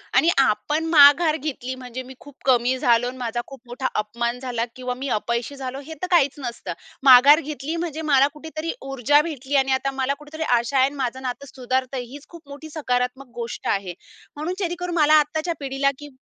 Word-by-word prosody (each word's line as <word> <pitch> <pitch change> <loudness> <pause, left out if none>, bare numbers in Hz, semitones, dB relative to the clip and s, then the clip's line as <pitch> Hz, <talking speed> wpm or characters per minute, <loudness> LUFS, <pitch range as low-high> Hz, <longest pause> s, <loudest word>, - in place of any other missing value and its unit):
आणि 330 - +5
आपण 270 +6 +1
माघार 305 +1 +7
घेतली 260 -4 -5
म्हणजे 255 0 -7
मी 260 +1 -11
खूप 285 -2 -15
कमी 255 0 +3
झालो 245 -2 +3
अन् 255 +1 -6
माझा 240 -1 -3
खूप 270 -3 -12
मोठा 255 +2 -3
अपमान 235 +3 -3
झाला 245 -3 -2
किंवा 250 -1 -4
मी 265 +2 -5
अपयशी 235 +5 -3
झालो 265 -1 -6
हे 320 - -7
तर 365 - -2
काहीचं 285 -4 +3
नसतं. 240 -2 -5 0.3
माघार 275 +3 +8
घेतली 295 +1 -5
म्हणजे 330 -2 -4
मला 275 0 +6
कुठेतरी 320 +1 -5 0.2
ऊर्जा 270 +3 +3
भेटली 285 -2 -4
आणि 265 - -3
आता 275 +1 0
मला 265 +2 +1
कुठेतरी 305 +2 -6 0.2
आशा 235 +4 -2
आहे 260 0 +5
अन् 285 - -12
माझं 260 -1 -3
नातं 260 +2 -5
सुधारत 255 0 -1
आहे, 255 -2 -3
हीचं 275 +4 -12
खूप 335 -4 -14
मोठी 290 +3 -9
सकारात्मक 255 -3 -2
गोष्ट 230 -1 -6
आहे. 195 -3 -1 0.4
म्हणून 310 +5 -3
जेणेकरून 350 -1 -3
मला 310 -1 +6
आत्ताच्या 315 +3 -3
पिढीला 275 0 0
की 295 0 -10
270 Hz, 195 wpm, -23 LUFS, 250-300 Hz, 0.4 s, माघार